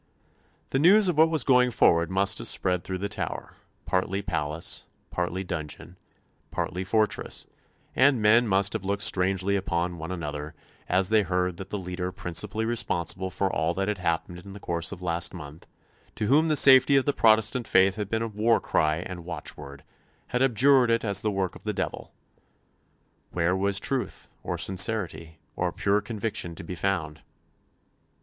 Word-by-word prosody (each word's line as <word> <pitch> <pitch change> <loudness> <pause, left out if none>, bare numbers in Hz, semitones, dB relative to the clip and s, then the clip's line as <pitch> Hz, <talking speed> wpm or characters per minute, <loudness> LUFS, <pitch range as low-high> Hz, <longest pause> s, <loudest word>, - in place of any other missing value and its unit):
The 135 - +1
news 190 +5 +5
of 170 - -1
what 160 +1 +6
was 160 -6 0
going 125 0 +4
forward 85 -7 +3
must 100 +1 +2
have - - 0
spread 90 -2 0
through 95 - -4
the 100 +2 -3
Tower, 105 - -5 0.3
partly 95 +3 -1
palace, 75 +1 -2 0.3
partly 90 +1 -2
dungeon, 85 0 -7 0.5
partly 90 +1 -3
fortress; 105 +2 -1 0.5
and 130 -1 +4
men 110 +3 +4
must 95 0 +1
have - - -4
looked 100 +1 -1
strangely 95 +1 +1
upon 85 -2 -2
one 80 +3 -6
another 75 -3 -5 0.3
as 95 0 +2
they 110 -1 +4
heard 90 -1 -1
that 95 +1 -8
the 105 - -3
leader 90 -1 -4
principally 95 +3 -2
responsible 95 -5 -1
for 95 +1 -2
all 80 +3 0
that 95 0 -1
had 105 -2 -2
happened 85 0 -2
in 95 +2 -11
the 100 - -10
course 85 -3 -3
of 100 - -6
the 90 - -10
last 85 +1 -1
month, 75 -1 -11 0.5
to - - -2
whom 150 +8 +3
the 155 - +2
safety 135 0 +7
of 135 - +3
the 145 - +1
Protestant 110 +1 +3
faith 95 0 +4
had 105 -1 -5
been 115 0 -2
war 110 +3 +2
cry 75 0 +1
and 90 -2 -7
watchword, 70 -5 -8 0.5
had 125 - -1
abjured 130 0 +4
it 115 0 +1
as 100 -2 +3
the 110 - 0
work 95 -3 -2
of - - -13
the - - -2
devil. - - -5 1.2
Where 90 +1 0
was 100 +1 0
truth, 135 -2 -3
or - - -4
sincerity, 95 -4 0 0.2
or - - -1
pure 100 +1 0
conviction 105 -4 -4
to - - -9
be 85 - -7
found? 85 -4 -2
95 Hz, 175 wpm, -26 LUFS, 90-110 Hz, 1.2 s, safety